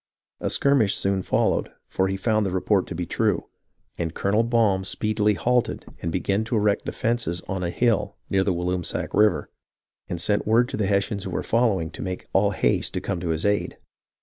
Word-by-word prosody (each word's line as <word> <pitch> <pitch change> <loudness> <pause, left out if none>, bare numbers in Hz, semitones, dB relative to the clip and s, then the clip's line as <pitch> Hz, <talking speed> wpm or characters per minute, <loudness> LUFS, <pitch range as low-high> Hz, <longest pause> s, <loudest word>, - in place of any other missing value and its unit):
A - - -1
skirmish 135 -8 +3
soon 95 -1 0
followed, - - +1 0.2
for 95 - 0
he 95 0 -2
found 110 +2 +1
the 100 - 0
report 95 +1 +1
to 90 - -6
be 90 +1 -2
true; 105 0 0 0.6
and 80 -1 -2
Colonel 105 +3 +2
Baum 115 -5 +2
speedily 105 +1 0
halted 125 +3 0 0.2
and 85 - -2
began 100 +4 0
to 115 - -2
erect 105 -1 +1
defences 115 -7 -1
on 95 -1 -3
a 85 - -1
hill 115 +4 +1
near 95 -1 +2
the 95 - +1
Walloomsac 90 0 -2
River, 105 0 +3 0.6
and 85 - -4
sent 105 +5 0
word 120 +3 +4
to - - -4
the 105 -2 0
Hessians 100 0 0
who - - -3
were - - -2
following 105 -9 +1
to - - -8
make 95 -1 -4
all 100 +1 +4
haste 100 - 0
to - - +1
come 90 - -3
to 85 -1 -3
his 80 +2 -1
aid. 105 0 0
100 Hz, 200 wpm, -24 LUFS, 90-110 Hz, 0.6 s, word